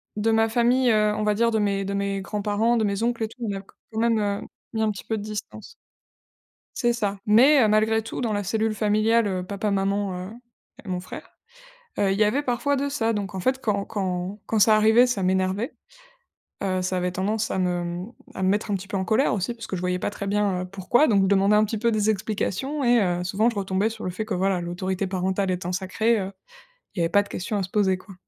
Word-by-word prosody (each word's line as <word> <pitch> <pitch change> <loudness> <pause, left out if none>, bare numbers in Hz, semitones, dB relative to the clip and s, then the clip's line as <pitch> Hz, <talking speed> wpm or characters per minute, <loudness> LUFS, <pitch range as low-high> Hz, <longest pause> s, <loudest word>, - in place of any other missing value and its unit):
de 220 +2 +1
ma 225 0 +3
famille, 245 +2 +3
heu, 210 -1 +3
on 215 - -2
va 210 -1 +1
dire, 230 +1 +2
de 220 - +1
mes 200 -1 0
de 200 - -3
mes 200 0 -1
grands-parents, 210 +3 0
de 220 - +1
mes 200 +1 -1
oncles 235 -1 0
et - - -5
tout, 230 - -17
on 200 - -2
a 195 - -5
quand 195 - -23 0.2
même, 230 -1 +2
heu, 205 -1 -1 0.3
mis 220 - -1
un 215 - +2
petit 195 - -8
peu 220 - -2
de - - -6
distance. 215 - -7 1.0
C'est 240 -1 +2
ça! 205 -4 -2
Mais, 260 +6 +6
heu, 215 - +4
malgré 220 +1 +2
tout, 225 - -6
dans 230 -3 -1
la 205 -1 -1
cellule 220 +2 0
familiale, 215 +2 +2
heu, 185 -2 -2
papa, 200 +2 -3
maman, 195 -1 -1
heu, - - -10 0.5
et - - -11
mon 180 -1 -2
frère, 185 - -9 0.7
heu, 195 -1 +2
il 195 - 0
y 215 - +4
avait 255 +8 +1
parfois 280 +2 0
de 280 +1 -1
ça. 230 -5 0
Donc, 200 -2 -4
en - - -3
fait, 260 +6 0
quand 200 -2 0
quand 190 0 -3
quand 220 - 0
ça 215 +1 +6
arrivait, 220 +3 +5
ça 245 -6 -1
m'énervait, 190 +4 0 0.9
heu, 185 -1 0
ça 185 0 -1
avait 180 0 -1
tendance 210 +4 -1
à 190 - -1
me, 180 -1 0
mmh, 175 +7 -5 0.2
à 190 - -3
me 185 - +3
mettre 205 +1 0
un - - +2
petit 195 +1 -6
peu 200 - -3
en 190 - -2
colère 220 +4 +2
aussi 210 +4 -1
parce 230 -1 -9
que 190 - -3
je 180 - -4
voyais 180 0 -1
pas - - -1
très 200 -1 -6
bien, 200 -3 +1
heu, - - -4
pourquoi, 195 +10 +2
donc 200 -3 +3
je - - +2
demandais 200 +1 +4
un 215 0 +4
petit 220 +1 -3
peu 235 +2 +1
des 215 0 +1
explications 220 +7 -2
et 240 -2 +4
heu, 175 -1 -1
souvent 210 +6 +1
je 230 - -6
retombais 195 +2 0
sur 220 -3 -8
le 180 - -2
fait 215 +4 -4
que, 215 - -4
voilà, 185 0 +1
l'autorité 185 +3 -3
parentale 190 +1 -1
étant 180 0 -3
sacrée, 215 +4 +1
heu, 190 0 -4 0.6
il - - -4
y - - +2
avait 165 - +1
pas 205 +1 +4
de 200 - -16
question 205 +3 -3
à 195 - -1
se 185 - -6
poser, 190 -2 +2
quoi. 195 +1 -14
205 Hz, 255 wpm, -24 LUFS, 190-225 Hz, 1.0 s, Mais